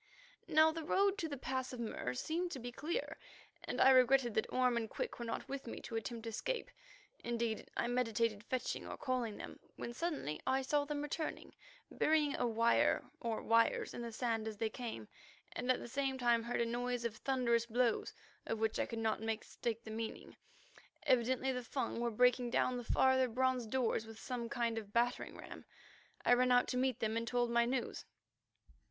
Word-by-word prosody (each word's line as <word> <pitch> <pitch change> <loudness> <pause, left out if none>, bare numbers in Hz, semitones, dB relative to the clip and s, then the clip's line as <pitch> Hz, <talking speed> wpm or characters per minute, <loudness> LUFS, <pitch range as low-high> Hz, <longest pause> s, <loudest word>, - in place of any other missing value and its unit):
Now 315 +1 +6
the 320 0 -5
road 395 +5 +2
to 325 - -2
the 285 - -4
Pass 260 0 -2
of 250 - -6
Mur 170 - -3
seemed 340 - -1
to 270 - -5
be 245 0 -6
clear, 330 - -3 0.5
and - - -3
I 265 - +8
regretted 255 -2 +5
that 220 - 0
Orme 250 -1 +3
and 225 -2 -1
Quick - - -4
were 235 - -3
not 230 +2 -4
with 275 -2 -5
me - - -5
to 230 - -6
attempt 225 +1 -4
escape. - - -3 0.5
Indeed, 235 -2 -2
I - - +1
meditated 230 -3 0
fetching 255 +2 -3
or - - -6
calling 245 -5 -1
them, - - -8 0.2
when 235 - -5
suddenly 285 - -3
I 265 +1 +2
saw 290 +2 +1
them 290 0 -3
returning, 305 +2 -4 0.4
burying 300 -2 +2
a 245 - +1
wire 230 0 +2
or 230 -2 -2
wires 230 0 +3
in - - -5
the 235 -1 -4
sand 225 -1 -1
as 215 -1 -5
they 220 0 -1
came, 225 - -6 0.4
and 250 +1 0
at 255 - +1
the - - -7
same 270 +1 -1
time 240 -2 +3
heard 235 +1 -1
a - - +2
noise 245 +1 -2
of 220 -2 -2
thunderous 235 -3 +1
blows 240 0 +1 0.4
of 225 - -1
which 220 0 0
I - - +1
could 230 - -5
not 220 -1 0
mistake 225 +1 -3
the 220 - -8
meaning. 220 0 -5 0.7
Evidently 255 +1 +2
the 250 -1 -3
Fung 240 -1 -2
were 240 0 +1
breaking 245 +2 +3
down 250 +1 +1
the 245 - -4
farther 260 +2 +4
bronze 255 0 +1
doors 225 -2 0
with 225 0 -10
some 235 0 -4
kind 235 -2 0
of 205 -2 -12
battering 240 +1 0
ram. - - -9 0.6
I - - +6
ran 250 +1 +4
out 245 0 +5
to - - -1
meet 255 -1 +1
them 220 0 0
and 230 0 -1
told 240 0 +1
my 235 0 +4
news. 250 0 -2
240 Hz, 195 wpm, -36 LUFS, 230-260 Hz, 0.7 s, I